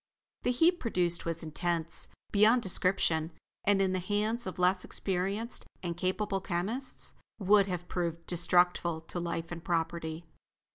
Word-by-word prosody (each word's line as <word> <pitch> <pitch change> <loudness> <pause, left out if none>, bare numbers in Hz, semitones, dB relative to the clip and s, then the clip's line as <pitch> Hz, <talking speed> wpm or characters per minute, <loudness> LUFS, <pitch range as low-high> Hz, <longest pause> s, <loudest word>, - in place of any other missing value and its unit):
The - - 0
heat 330 +8 +3
produced 175 -7 +1
was 165 0 -3
intense 165 +1 -2 0.2
beyond 220 +4 +5
description, 170 -3 +1 0.3
and 205 -1 +4
in 190 -1 +2
the 185 - 0
hands 210 +4 -1
of 185 - -5
less 180 +1 +2
experienced 195 +5 -1 0.2
and 170 -1 -2
capable 190 +2 -1
chemists, 200 +9 -2 0.2
would 200 0 +4
have 180 -2 -4
proved 170 -2 -3
destructful 175 -1 +2
to 175 - -2
life 170 -1 -3
and 170 -1 -6
property. 165 -1 -2
180 Hz, 140 wpm, -31 LUFS, 170-200 Hz, 0.3 s, beyond